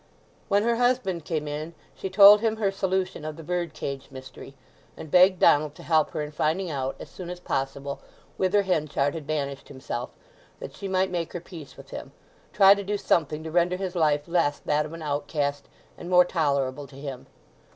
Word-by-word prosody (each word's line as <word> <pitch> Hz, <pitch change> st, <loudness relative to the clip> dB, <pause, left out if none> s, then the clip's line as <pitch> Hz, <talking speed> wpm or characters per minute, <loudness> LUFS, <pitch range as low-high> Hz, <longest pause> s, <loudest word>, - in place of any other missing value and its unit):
When 200 Hz, +1 st, +3 dB
her 235 Hz, 0 st, +1 dB
husband 245 Hz, -9 st, 0 dB
came 155 Hz, -3 st, -2 dB
in 155 Hz, +3 st, -5 dB, 0.2 s
she 190 Hz, -, -5 dB
told 200 Hz, +2 st, +8 dB
him 225 Hz, -1 st, +1 dB
her 210 Hz, -3 st, 0 dB
solution 190 Hz, -3 st, -2 dB
of 155 Hz, 0 st, -5 dB
the 165 Hz, -, -10 dB
bird 175 Hz, -1 st, -3 dB
cage 140 Hz, -1 st, -5 dB
mystery; 130 Hz, -1 st, -11 dB, 0.4 s
and 155 Hz, -, -9 dB
begged 185 Hz, +1 st, +6 dB
Donald 150 Hz, -2 st, +4 dB
to -, -, -12 dB
help 155 Hz, -2 st, +2 dB
her 150 Hz, -, -3 dB
in 150 Hz, -, -6 dB
finding 160 Hz, +4 st, -1 dB
out, 135 Hz, -2 st, -3 dB
as -, -, -8 dB
soon 180 Hz, -2 st, -9 dB
as 180 Hz, 0 st, -6 dB
possible, 140 Hz, -3 st, -3 dB, 0.4 s
whither 195 Hz, +2 st, +2 dB
Henchard 150 Hz, -6 st, 0 dB
had 155 Hz, -3 st, -7 dB
banished 140 Hz, -3 st, -3 dB
himself, 130 Hz, -3 st, -5 dB, 0.5 s
that -, -, -8 dB
she 200 Hz, -, -6 dB
might 190 Hz, 0 st, +1 dB
make 170 Hz, -2 st, -3 dB
her 175 Hz, -, -3 dB
peace 165 Hz, -4 st, -12 dB
with -, -, -13 dB
him; -, -, -8 dB, 0.4 s
try 195 Hz, -1 st, +7 dB
to 200 Hz, 0 st, -4 dB
do 205 Hz, +1 st, -2 dB
something 155 Hz, -5 st, 0 dB
to 160 Hz, -, -6 dB
render 175 Hz, +2 st, +2 dB
his 185 Hz, -1 st, -4 dB
life 150 Hz, -3 st, +1 dB
less 170 Hz, -4 st, +1 dB
that 150 Hz, +1 st, 0 dB
of 155 Hz, -, -11 dB
an 165 Hz, -1 st, -8 dB
outcast, 145 Hz, -1 st, -2 dB, 0.3 s
and 175 Hz, -, -7 dB
more 180 Hz, 0 st, +6 dB
tolerable 140 Hz, -5 st, -1 dB
to 135 Hz, -, -16 dB
him. 135 Hz, -2 st, -7 dB
160 Hz, 200 wpm, -26 LUFS, 145-185 Hz, 0.5 s, told